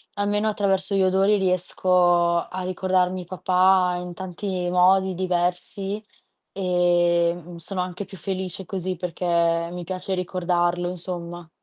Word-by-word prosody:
almeno 205 +1 0
attraverso 195 -2 0
gli 195 - +3
odori 195 +3 +3
riesco 180 -2 +2
a 185 - -5
ricordarmi 185 0 0
papà 185 0 +3
in 180 0 -7
tanti 185 0 -4
modi 190 +1 +4
diversi 185 +3 -1 0.5
e, 175 -2 +2
mhmm, 175 0 -11
sono 180 +3 -4
anche 180 +2 -5
più 195 -1 -12
felice 190 +1 -4
così 185 0 -3
perché 180 +1 -5 0.5
mi 180 0 -6
piace 185 +2 -4
ricordarlo, 175 -1 0
insomma. 175 -1 -6
180 Hz, 125 wpm, -24 LUFS, 175-190 Hz, 0.5 s, modi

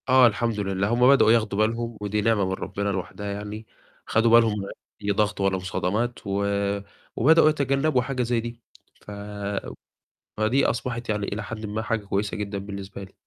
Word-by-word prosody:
آه 130 -1 +7
الحمد 115 -1 -1
لله، 100 -1 0
هم 125 +1 +4
بدؤوا 135 -5 +6
ياخدوا 110 -3 +2
بالهم 115 +1 0
ودي 105 +1 -1
نعمة 105 -2 +2
من 95 - -1
ربِّنا 100 +1 -3
لوحدها 100 +1 -4
يعني، 105 +2 -6 0.4
خدوا 115 +1 +2
بالهم 115 -2 +5
من 100 - -5 0.4
أي 100 - +1
ضغط 105 0 0
ولا 95 -1 +2
مصادمات 105 +6 -2
و 100 +1 0 0.7
وبدؤوا 160 +4 +6
يتجنّبوا 140 -1 +1
حاجة 130 0 -2
زي 120 0 0
دي. 120 0 -7 0.4
ف - - -11 1.3
فدي 110 +6 +2
أصبحت 120 0 -2
يعني 105 -1 0
إلى 105 +1 -4
حدٍ 110 +2 -6
ما 105 +1 -3
حاجة 110 -1 -2
كويسة 100 +1 -1
جدًا 100 -1 -4
بالنسبة 100 0 -7
لي. 95 - -13
110 Hz, 170 wpm, -25 LUFS, 100-120 Hz, 1.3 s, آه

